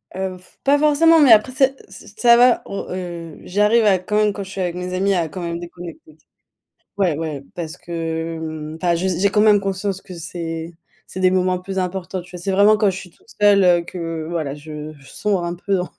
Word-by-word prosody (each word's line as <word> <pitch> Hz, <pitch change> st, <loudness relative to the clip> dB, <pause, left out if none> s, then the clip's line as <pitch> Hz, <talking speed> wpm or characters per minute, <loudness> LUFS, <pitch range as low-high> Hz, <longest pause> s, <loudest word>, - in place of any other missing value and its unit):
Heu, 190 Hz, -1 st, -3 dB, 0.3 s
pas 280 Hz, +1 st, +4 dB
forcément. 315 Hz, +2 st, +5 dB
Mais 285 Hz, -5 st, +6 dB
après, 220 Hz, +3 st, +6 dB
c'est 270 Hz, 0 st, +3 dB
ç 190 Hz, +2 st, -13 dB
ça 235 Hz, +2 st, +6 dB
va. 245 Hz, 0 st, +5 dB
On, 200 Hz, -, -5 dB
heu, 170 Hz, -3 st, -6 dB
j'arrive 210 Hz, +4 st, +2 dB
à 190 Hz, -3 st, +4 dB
quand 195 Hz, +3 st, -4 dB
même, 210 Hz, -1 st, +3 dB
quand 200 Hz, -, -5 dB
je 190 Hz, -, -11 dB
suis 195 Hz, -1 st, -5 dB
avec 175 Hz, -1 st, -2 dB
mes 180 Hz, 0 st, -5 dB
amis, 195 Hz, +2 st, +1 dB
à 170 Hz, -4 st, 0 dB
quand 180 Hz, -, -7 dB
même 170 Hz, 0 st, -4 dB
déconnecter. 170 Hz, -3 st, -11 dB, 0.8 s
Ouai, 180 Hz, -6 st, +1 dB
ouais, 155 Hz, -3 st, -4 dB
parce 170 Hz, -1 st, -6 dB
que, 160 Hz, -2 st, -5 dB
enfin, 170 Hz, +1 st, +1 dB
j'ai 180 Hz, 0 st, -1 dB
j'ai 200 Hz, +2 st, +2 dB
quand 210 Hz, -, +2 dB
même 210 Hz, -1 st, +6 dB
conscience 195 Hz, 0 st, -3 dB
que 185 Hz, -, -10 dB
c'est 165 Hz, 0 st, -6 dB, 0.3 s
c'est 185 Hz, -, -7 dB
des 185 Hz, -, +4 dB
moments 185 Hz, 0 st, +1 dB
plus 190 Hz, +1 st, -6 dB
importants. 185 Hz, 0 st, -3 dB
Tu 180 Hz, -, -17 dB
vois, 180 Hz, -, -8 dB
c'est 195 Hz, -, -1 dB
vraiment 205 Hz, +3 st, +5 dB
quand 210 Hz, -2 st, +2 dB
je 185 Hz, -, -6 dB
suis 180 Hz, -2 st, -9 dB
toute -, -, -29 dB
seule, 205 Hz, -2 st, +5 dB
heu, 175 Hz, -1 st, +5 dB
que 165 Hz, -3 st, -5 dB
voilà, 160 Hz, -5 st, -3 dB
je 150 Hz, +1 st, -8 dB
je 135 Hz, -, -18 dB
sombre 200 Hz, -4 st, -1 dB
un 175 Hz, 0 st, -3 dB
peu 195 Hz, +3 st, -2 dB
dans 180 Hz, -1 st, -1 dB
180 Hz, 225 wpm, -20 LUFS, 170-200 Hz, 0.8 s, Mais